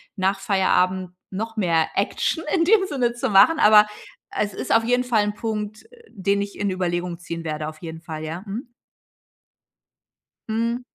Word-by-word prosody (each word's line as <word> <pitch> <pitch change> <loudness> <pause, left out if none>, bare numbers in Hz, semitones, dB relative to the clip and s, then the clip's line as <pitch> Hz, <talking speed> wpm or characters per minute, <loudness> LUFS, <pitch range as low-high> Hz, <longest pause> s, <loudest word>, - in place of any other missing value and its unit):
nach 195 0 0
Feierabend 185 -2 +1 0.2
noch 225 +4 -5
mehr 165 -5 +2
Action 325 - 0
in 335 - +3
dem 390 +2 +4
Sinne 250 -8 0
zu 240 - -2
machen. 210 +11 +6
Aber 210 0 +7 0.4
es 205 -1 -2
ist - - -2
auf 225 - +4
jeden 245 +1 +2
Fall 235 -4 +2
'n 210 0 -2
Punkt, 215 -1 -4 0.3
den 200 -1 0
ich 200 0 -6
in 205 - 0
Überlegung 175 -1 -2
ziehen 170 -1 -6
werde 155 -1 -3
auf 155 0 -9
jeden 165 -1 -7
Fall, 160 -2 -7
ja. 165 +4 -5
Mhm. 235 +5 -7 1.8
Hm. 230 +2 -1
200 Hz, 165 wpm, -23 LUFS, 180-225 Hz, 1.8 s, Aber